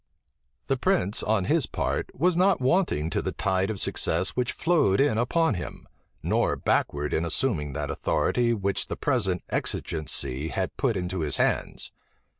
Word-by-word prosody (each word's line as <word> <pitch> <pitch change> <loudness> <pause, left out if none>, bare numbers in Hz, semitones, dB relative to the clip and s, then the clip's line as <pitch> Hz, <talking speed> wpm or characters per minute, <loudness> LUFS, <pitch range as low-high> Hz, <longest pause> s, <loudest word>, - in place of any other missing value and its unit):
The 135 - 0
prince 125 - +1
on 105 -3 +1
his 155 - +2
part - - -2
was 175 +5 +2
not 185 +1 +3
wanting 130 - +1
to - - 0
the - - -2
tide 95 +1 0
of 105 -3 -3
success 90 +1 +1
which 125 -1 -1
flowed 155 - +2
in 135 -5 +3
upon 160 +4 +2
him, 90 - -6 0.4
nor - - +1
backward 75 0 0
in 80 - +1
assuming 85 - 0
that - - -3
authority 120 -1 +1
which 100 -3 -1
the - - -5
present 100 - 0
exigency 75 -3 -2
had 95 +3 -3
put 125 -7 0
into 90 0 -3
his 75 -3 +1
hands. - - -1
105 Hz, 160 wpm, -26 LUFS, 90-135 Hz, 0.4 s, not